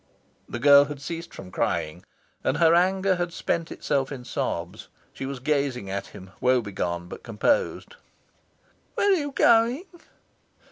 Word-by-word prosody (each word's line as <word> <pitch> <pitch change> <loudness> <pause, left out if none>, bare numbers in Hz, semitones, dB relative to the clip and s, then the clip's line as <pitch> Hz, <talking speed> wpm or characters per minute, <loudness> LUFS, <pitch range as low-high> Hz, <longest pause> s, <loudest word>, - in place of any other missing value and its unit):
The - - -4
girl 140 +3 +7
had 145 -1 -7
ceased 165 +4 -6
from 90 - -10
crying, 80 0 -2 0.4
and 130 - 0
her 165 0 +5
anger 190 +2 +3
had 175 -1 -2
spent 165 0 -2
itself 135 -2 -1
in 125 -3 -7
sobs. 85 -4 -4 0.3
She 135 - -5
was 140 0 -5
gazing 130 -6 -1
at 100 0 -3
him 95 -2 -12
woebegone 100 -9 0
but - - -9
composed. 125 - -1 1.0
"Where 405 - +3
are - - +6
you 290 -4 -2
going?" 235 +6 +3
140 Hz, 145 wpm, -25 LUFS, 110-175 Hz, 1.0 s, girl